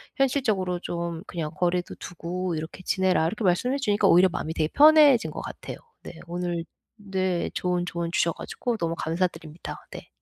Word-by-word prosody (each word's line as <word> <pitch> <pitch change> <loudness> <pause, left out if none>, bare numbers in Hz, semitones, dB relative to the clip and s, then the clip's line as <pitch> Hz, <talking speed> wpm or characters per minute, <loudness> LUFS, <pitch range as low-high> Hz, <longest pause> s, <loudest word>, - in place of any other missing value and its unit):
현실적으로 220 -10 +1
좀 170 0 -4
"그냥 160 -3 -4
거리도 180 0 0
두고 175 0 -4
이렇게 160 +4 -6
지내라." 185 -4 +2
이렇게 210 +6 -4
말씀해 195 +9 +2
주니까 205 -6 +2
오히려 180 +2 +6
마음이 160 -2 -3
되게 155 -1 0
편해진 295 -4 +6
것 - - -6
같아요. - - -7 0.3
네. - - -8
오늘 175 -1 -2 0.3
네 190 -3 -1
좋은 180 -1 -1
조언 170 -1 -3
주셔 170 - +2
가지고 240 -2 -4
너무 165 -3 -1
감사드립니다. 165 -1 -3
네. - - -9
180 Hz, 380 characters per minute, -26 LUFS, 170-200 Hz, 0.3 s, 오히려